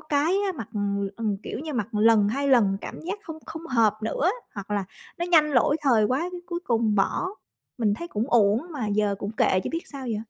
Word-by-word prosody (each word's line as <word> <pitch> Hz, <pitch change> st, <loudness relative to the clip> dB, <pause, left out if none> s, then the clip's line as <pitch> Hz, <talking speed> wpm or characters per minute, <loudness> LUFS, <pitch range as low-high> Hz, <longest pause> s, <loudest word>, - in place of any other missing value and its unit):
cái 310 Hz, +5 st, +1 dB
á, 385 Hz, -, 0 dB
mặc, 225 Hz, -6 st, -6 dB
ừm, 200 Hz, -1 st, -1 dB
ừm, 215 Hz, -3 st, -1 dB
kiểu -, -, -5 dB
như, 305 Hz, +3 st, -5 dB
mặc 220 Hz, -5 st, -1 dB
lần 210 Hz, -1 st, +4 dB
2 280 Hz, +5 st, -1 dB
lần 220 Hz, -7 st, +4 dB
cảm -, -, -7 dB
giác 375 Hz, +6 st, -4 dB
không 320 Hz, -5 st, -8 dB
không 325 Hz, +1 st, -7 dB
hợp 230 Hz, -7 st, +3 dB
nữa, 280 Hz, +10 st, +1 dB, 0.2 s
hoặc 200 Hz, -1 st, -7 dB
là 205 Hz, -2 st, 0 dB, 0.3 s
nó 345 Hz, -, -1 dB
nhanh 315 Hz, -4 st, +5 dB
lỗi 275 Hz, +3 st, +3 dB
thời 240 Hz, -7 st, +4 dB
quá, 255 Hz, +5 st, +1 dB
cái 355 Hz, -, -6 dB
cuối 345 Hz, -1 st, -3 dB
cùng 225 Hz, -3 st, +1 dB
bỏ. 205 Hz, -, +1 dB, 0.5 s
Mình 210 Hz, -3 st, +2 dB
thấy 340 Hz, +10 st, -7 dB
cũng 215 Hz, -3 st, -2 dB
uổng 215 Hz, -1 st, +4 dB
mà 275 Hz, -9 st, -3 dB
giờ 205 Hz, 0 st, +1 dB
cũng 205 Hz, +2 st, -4 dB
kệ 185 Hz, -4 st, +2 dB
chứ -, -, -2 dB
biết 330 Hz, +1 st, -2 dB
sao 270 Hz, -2 st, -6 dB
giờ? 225 Hz, -3 st, -1 dB
230 Hz, 235 wpm, -25 LUFS, 210-300 Hz, 0.5 s, nhanh